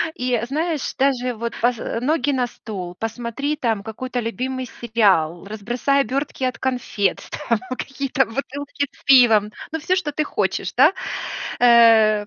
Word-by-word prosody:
И, 250 Hz, 0 st, -2 dB
э, 235 Hz, 0 st, 0 dB
знаешь, 310 Hz, +2 st, -2 dB
даже 255 Hz, -2 st, +1 dB
вот 235 Hz, +1 st, -4 dB
поз 240 Hz, 0 st, +2 dB
э, 230 Hz, -, -3 dB
ноги 290 Hz, +2 st, +1 dB
на 255 Hz, -2 st, +1 dB
стол, 185 Hz, -7 st, -7 dB
посмотри 240 Hz, +6 st, -3 dB
там 225 Hz, -6 st, -1 dB
какой-то 245 Hz, +4 st, -4 dB
любимый 255 Hz, +3 st, -3 dB
сериал, 195 Hz, -9 st, +1 dB
разбросай 240 Hz, +7 st, 0 dB
обертки 270 Hz, 0 st, -3 dB
от 255 Hz, -1 st, -1 dB
конфет, 245 Hz, -6 st, -1 dB, 0.3 s
там 230 Hz, -, +3 dB, 0.2 s
какие-то 270 Hz, -1 st, -1 dB
бутылки 280 Hz, +3 st, -4 dB
с -, -, -23 dB
пивом, 225 Hz, -6 st, +6 dB, 0.2 s
ну 320 Hz, -, -1 dB
всё, 365 Hz, +4 st, +1 dB
что 335 Hz, -6 st, -2 dB
ты 305 Hz, +1 st, -1 dB
хочешь 190 Hz, -6 st, -2 dB
да, 285 Hz, +8 st, +6 dB, 0.7 s
э, 225 Hz, -3 st, +6 dB
245 Hz, 150 wpm, -21 LUFS, 220-275 Hz, 0.7 s, пивом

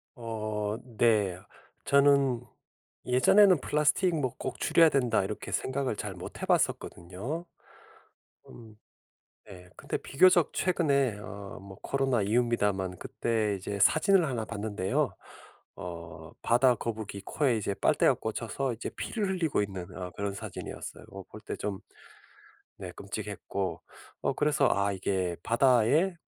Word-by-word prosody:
어 110 Hz, -2 st, -3 dB, 0.2 s
네 105 Hz, -6 st, +3 dB, 0.5 s
저는 140 Hz, -3 st, +4 dB, 0.6 s
예전에는 180 Hz, +9 st, +5 dB
플라스틱 150 Hz, +6 st, +2 dB
뭐 130 Hz, -4 st, -1 dB
'꼭 130 Hz, -, -5 dB
줄여야 165 Hz, 0 st, +5 dB
된다.' 125 Hz, -8 st, +2 dB
이렇게 105 Hz, +2 st, -5 dB
생각을 130 Hz, -3 st, -1 dB
잘 105 Hz, -2 st, -5 dB
못 90 Hz, -, -9 dB
해 -, -, -2 dB
봤었거든요. 100 Hz, -, -1 dB, 1.0 s
음 110 Hz, -2 st, -13 dB, 0.7 s
네 90 Hz, -2 st, -12 dB
근데 -, -, -5 dB
비교적 175 Hz, +3 st, +4 dB
최근에 140 Hz, -, +1 dB
어 100 Hz, -1 st, -8 dB
뭐 95 Hz, -1 st, -11 dB
코로나 135 Hz, -4 st, 0 dB
이후입니다만 105 Hz, -4 st, +1 dB
그때 110 Hz, 0 st, -1 dB
이제 100 Hz, +2 st, -5 dB
사진을 175 Hz, -, +4 dB
1 120 Hz, -4 st, -2 dB
봤는데요. 105 Hz, -3 st, -2 dB, 0.6 s
어 85 Hz, -2 st, -8 dB
바다거북이 115 Hz, -4 st, +1 dB
코에 135 Hz, -5 st, +1 dB
이제 100 Hz, -2 st, -2 dB
빨대가 -, -, +3 dB
꽂혀서 115 Hz, +4 st, -3 dB
이제 115 Hz, -, -5 dB
피를 215 Hz, -4 st, -3 dB
흘리고 170 Hz, -, 0 dB
있는 95 Hz, -3 st, -5 dB
어 90 Hz, -1 st, -6 dB
그런 100 Hz, -1 st, -3 dB
사진이었어요. -, -, -7 dB
뭐 95 Hz, 0 st, -8 dB
볼 110 Hz, -, -9 dB
때 -, -, -5 dB
좀 100 Hz, -2 st, -4 dB, 1.0 s
네 -, -, -7 dB
끔찍했고 100 Hz, -1 st, -5 dB, 0.4 s
어 -, -, 0 dB
그래서 145 Hz, -2 st, +2 dB
아 100 Hz, +1 st, +1 dB
이게 95 Hz, -2 st, -1 dB
바다에 130 Hz, -, +3 dB
115 Hz, 270 characters per minute, -29 LUFS, 100-140 Hz, 1.0 s, 예전에는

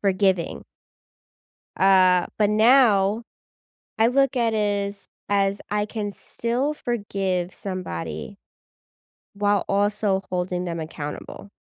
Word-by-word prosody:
forgiving. 190 Hz, -3 st, +1 dB, 1.1 s
Uh, 185 Hz, -2 st, +5 dB
but 210 Hz, -1 st, +3 dB
now 220 Hz, -2 st, +4 dB, 0.7 s
I 225 Hz, -, +5 dB
look 275 Hz, +2 st, +2 dB
at 230 Hz, -2 st, +1 dB
is 205 Hz, -1 st, -1 dB, 0.2 s
as 200 Hz, 0 st, +1 dB
I 210 Hz, 0 st, +1 dB
can 210 Hz, -1 st, -4 dB
still 245 Hz, +8 st, -2 dB
forgive 195 Hz, -9 st, -2 dB
somebody 85 Hz, -, -6 dB, 1.0 s
while 205 Hz, -1 st, +1 dB
also 205 Hz, -1 st, +1 dB
holding 180 Hz, 0 st, -2 dB
them 170 Hz, -1 st, -4 dB
accountable. 155 Hz, +4 st, -7 dB
200 Hz, 100 wpm, -24 LUFS, 185-215 Hz, 1.1 s, Uh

